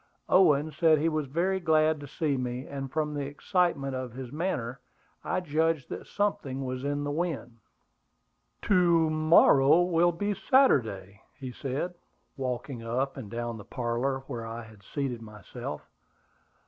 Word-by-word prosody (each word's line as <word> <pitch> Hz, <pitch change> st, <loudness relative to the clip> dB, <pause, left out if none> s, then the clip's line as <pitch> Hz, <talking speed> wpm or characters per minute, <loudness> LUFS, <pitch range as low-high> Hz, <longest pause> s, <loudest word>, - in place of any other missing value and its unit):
Owen 155 Hz, -5 st, +4 dB
said 160 Hz, -1 st, +4 dB
he 160 Hz, +3 st, +1 dB
was 155 Hz, -2 st, -2 dB
very 180 Hz, +7 st, 0 dB
glad 155 Hz, -2 st, +3 dB
to 145 Hz, -, -8 dB
see 150 Hz, 0 st, -1 dB
me; 125 Hz, 0 st, -3 dB
and 135 Hz, -2 st, -6 dB
from 150 Hz, 0 st, -1 dB
the 145 Hz, -1 st, -3 dB
excitement 145 Hz, -2 st, 0 dB
of 130 Hz, -2 st, -5 dB
his 130 Hz, -1 st, -7 dB
manner, 140 Hz, -6 st, -2 dB, 0.4 s
I 185 Hz, -, -1 dB
judged 160 Hz, -3 st, 0 dB
that -, -, -6 dB
something 140 Hz, -10 st, -2 dB
was 130 Hz, 0 st, -4 dB
in 145 Hz, 0 st, -1 dB
the 145 Hz, -, -2 dB
wind. 145 Hz, -8 st, -3 dB, 1.0 s
"To 170 Hz, -4 st, +4 dB
morrow 155 Hz, 0 st, +5 dB
will 175 Hz, 0 st, +3 dB
be 205 Hz, +5 st, -1 dB
Saturday," 110 Hz, -, +2 dB, 0.3 s
said 140 Hz, +8 st, -3 dB
he, 175 Hz, -, -25 dB, 0.4 s
walking 125 Hz, -1 st, -4 dB
up 130 Hz, +4 st, -2 dB
and 120 Hz, -7 st, -8 dB
down 120 Hz, 0 st, -4 dB
the -, -, -9 dB
parlor 125 Hz, +3 st, -2 dB
where 120 Hz, -5 st, -5 dB
I 115 Hz, +1 st, -6 dB
had 110 Hz, -2 st, -15 dB
seated 125 Hz, +1 st, -4 dB
myself. 105 Hz, -3 st, -8 dB
140 Hz, 150 wpm, -28 LUFS, 125-165 Hz, 1.0 s, morrow